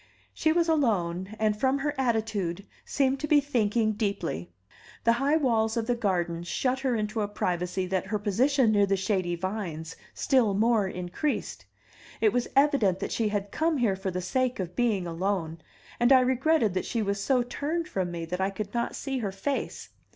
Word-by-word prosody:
She 315 - +1
was 340 +1 +2
alone, 200 - 0
and, 215 -1 +1
from 260 +5 +1
her 290 +1 -1
attitude, 220 -8 -1 0.2
seemed 270 -1 0
to 300 - -3
be 300 0 +5
thinking 230 -5 +1
deeply. 200 - -3 0.5
The 230 - +5
high 285 +3 +3
walls 230 -5 +1
of 230 - 0
the 245 - +1
garden 175 -7 -1
shut 255 +9 -1
her 260 -2 0
into 215 +1 -2
a 205 - 0
privacy 180 -2 -2
that 190 +1 -2
her 210 +2 -1
position 235 +5 +2
near 205 -1 +3
the 195 0 +1
shady 185 -3 0
vines 175 -3 -4 0.2
still 240 -8 +2
more 220 -1 +3
increased. 180 +11 -3 0.5
It 430 - +3
was 245 - 0
evident 275 -10 +3
that - - -4
she 225 - 0
had 205 -1 -3
come 320 -1 +1
here 225 -7 +2
for 190 0 -3
the 180 0 -3
sake 255 +2 0
of 180 -1 -4
being 220 -7 +1
alone, 170 -1 -2 0.4
and 240 +2 +4
I 260 -1 +8
regretted 260 - +2
that 185 - -1
she 230 -2 -1
was 200 0 -2
so 255 -3 +2
turned 310 +7 -3
from 185 -2 -2
me 170 -1 -4
that 180 +3 -3
I 190 - +2
could 200 +1 -6
not 235 0 -1
see 270 -2 -3
her 205 -5 -2
face. 235 +9 -3
215 Hz, 190 wpm, -27 LUFS, 190-260 Hz, 0.5 s, I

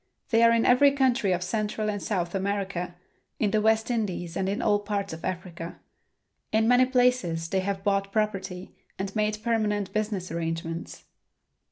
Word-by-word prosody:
They 225 -1 +4
are 230 0 +7
in 230 0 +3
every 275 +3 +6
country 255 -7 +2
of 180 0 0
Central 215 +3 -2
and 205 -2 -2
South 175 -5 -2
America, 195 -3 -2 0.4
in 210 -3 +1
the 215 0 +2
West 220 +2 +2
Indies 185 -7 -2
and 190 - 0
in 200 - -1
all 205 -1 +2
parts 200 -2 -3
of 160 - -9
Africa. 175 -2 -5 0.7
In 220 +1 +3
many 245 +1 +6
places 245 -11 +1
they 190 - +1
have 195 0 -2
bought 195 -1 +1
property 195 -4 -2 0.2
and 195 +2 -4
made 215 0 +1
permanent 210 -4 0
business 210 -4 -2
arrangements. 165 0 -4
200 Hz, 165 wpm, -27 LUFS, 185-220 Hz, 0.7 s, are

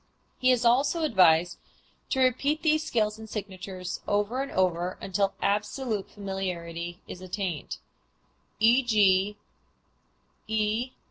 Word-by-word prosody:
He 255 - +3
is 250 -1 +3
also 275 +7 +3
advised 175 - +4 0.5
to 265 - +1
repeat 275 +4 +1
these 310 -1 +3
scales 220 -7 0
and 220 0 -10
signatures 185 -3 -6
over 205 +5 0
and 275 - -4
over 180 -1 0
until 195 +1 -1
absolute 210 +1 -1
familiarity 175 -3 -5
is 180 - -8
attained. 185 -4 -4 0.8
_E. 210 -4 +4
205 Hz, 105 wpm, -27 LUFS, 185-245 Hz, 0.8 s, advised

